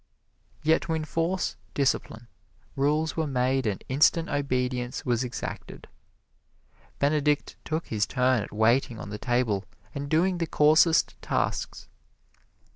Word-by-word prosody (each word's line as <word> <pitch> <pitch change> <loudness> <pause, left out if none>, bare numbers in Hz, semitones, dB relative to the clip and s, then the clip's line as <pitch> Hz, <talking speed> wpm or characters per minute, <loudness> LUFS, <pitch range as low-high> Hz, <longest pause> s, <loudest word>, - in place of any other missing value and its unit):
Yet 160 +1 +3
to 165 - -3
enforce 165 +4 -1 0.2
discipline, 120 -4 -1 0.5
rules 150 +3 +1
were 160 -1 -1
made 130 -1 0
and 100 -3 -3
instant 155 +5 +3
obedience 125 -3 -2
was 120 0 +1
exacted. 125 0 -7 1.1
Benedict 150 0 +1
took 160 +1 -3
his 105 -2 -1
turn 125 -2 +2
at - - -7
waiting 115 +3 +2
on 100 - -8
the 105 - -5
table 120 -5 0 0.3
and 140 0 -5
doing 175 +4 +2
the 165 - -1
coarsest 155 +2 +4
tasks. - - -2
140 Hz, 120 wpm, -27 LUFS, 125-155 Hz, 1.1 s, coarsest